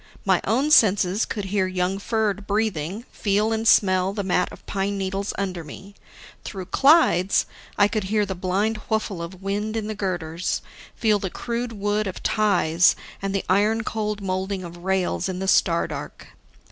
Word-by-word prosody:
My 190 -2 +3
own 260 +8 +1
senses 205 -4 +4
could 205 -2 -4
hear 190 -2 +2
young 185 +1 -1
Ferd 210 -2 -1
breathing, 205 -1 -1
feel 210 +2 +1
and 225 0 -1
smell 185 -2 +4
the 205 -1 -3
mat 180 -1 +1
of - - -13
pine 200 0 -2
needles 195 +1 -2
under 185 -4 -3
me. 195 +7 -11 0.5
Through 190 -3 -6
Clyde's, 270 - +4 0.3
I 205 - +5
could 210 -2 -2
hear 210 +1 +1
the 190 - -3
blind 190 +4 -1
whuffle 215 -5 -1
of 180 +3 -8
wind 210 +3 -2
in 220 - -2
the 215 - -3
girders, 175 -4 -3 0.3
feel 215 -3 +2
the 190 - -3
crude 235 +4 -4
wood 205 0 -1
of 185 - -6
ties 180 -6 +3 0.3
and 195 0 -2
the 195 - -1
iron 210 +4 +2
cold 210 -2 -3
molding 190 0 -2
of 175 0 -9
rails 185 0 -1
in 185 - -3
the 190 +1 -3
star 170 -3 +3
dark. - - -8
195 Hz, 170 wpm, -23 LUFS, 185-215 Hz, 0.5 s, I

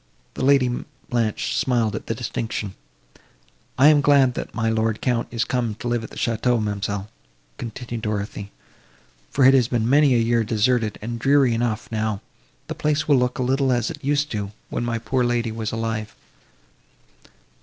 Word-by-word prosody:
The - - -4
Lady 135 -1 +5 0.4
Blanche 115 -3 0
smiled 115 -5 +1
at - - -6
the 115 - -1
distinction. 110 -3 -4 1.0
"I 140 +3 +7
am 150 -2 +5
glad, 140 -3 +4
that - - -6
my 110 0 0
lord 110 -1 +1
the - - -16
Count 120 -2 0
is 115 -1 -1
come 120 -4 -1
to 120 - -6
live 120 -1 0
at - - -7
the - - -13
château, 120 +1 +1
ma'amselle," 100 -1 -2 0.5
continued 120 0 -6
Dorothée, 105 -1 -3 0.8
"for 135 - +3
it 135 - +8
has 130 -4 +4
been 120 -3 0
many 140 0 +5
a - - +4
year 115 0 +2
deserted, 110 0 +1
and 115 +1 -4
dreary 135 0 +4
enough; 115 -1 -1
now, 110 -2 -1 0.5
the - - -5
place 150 0 0
will 145 -3 +5
look 125 0 0
a 130 - 0
little 135 +1 +1
as 120 +1 0
it 145 -3 -10
used 145 +1 0
to 110 - -2
do, - - -13 0.2
when - - -2
my 120 -1 -1
poor 125 +2 0
lady 120 -1 0
was 110 0 -4
alive." 110 -1 -3
120 Hz, 185 wpm, -23 LUFS, 110-130 Hz, 1.0 s, it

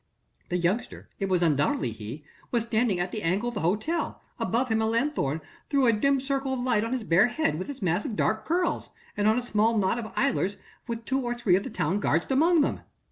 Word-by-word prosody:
The 180 - 0
youngster 190 +8 -2
it 195 -1 -1
was 180 -2 +2
undoubtedly 145 -5 +1
he 110 +7 -8 0.3
was 235 -2 +1
standing 225 -4 +1
at 180 +1 -1
the 215 - -3
angle 195 +8 0
of - - -8
the 205 - -3
hotel: 215 - -1 0.2
above 245 +3 0
him 220 0 +2
a 220 - +1
lanthorn 225 - 0 0.3
threw 275 -2 +3
a 230 - +5
dim 275 +6 +2
circle 270 0 -1
of - - -4
light 245 -4 +2
on 230 - -3
his 255 -3 -1
bare 185 +2 +4
head 245 - 0
with 185 - -5
its 275 -6 -6
mass 175 +2 +1
of 220 - -4
dark 220 +1 0
curls, 350 +2 0 0.3
and 205 0 +1
on 220 +2 +4
a 250 - 0
small 225 -1 +2
knot 205 +3 +1
of 220 -2 -6
idlers 205 -7 +1 0.3
with 230 -1 -5
two 265 +1 0
or 240 -1 -2
three 230 -7 +3
of 190 - +2
the - - -6
town 185 +7 -1
guard 165 -4 +1
amongst 320 +4 +4
them. - - -1
220 Hz, 235 wpm, -27 LUFS, 185-255 Hz, 0.3 s, a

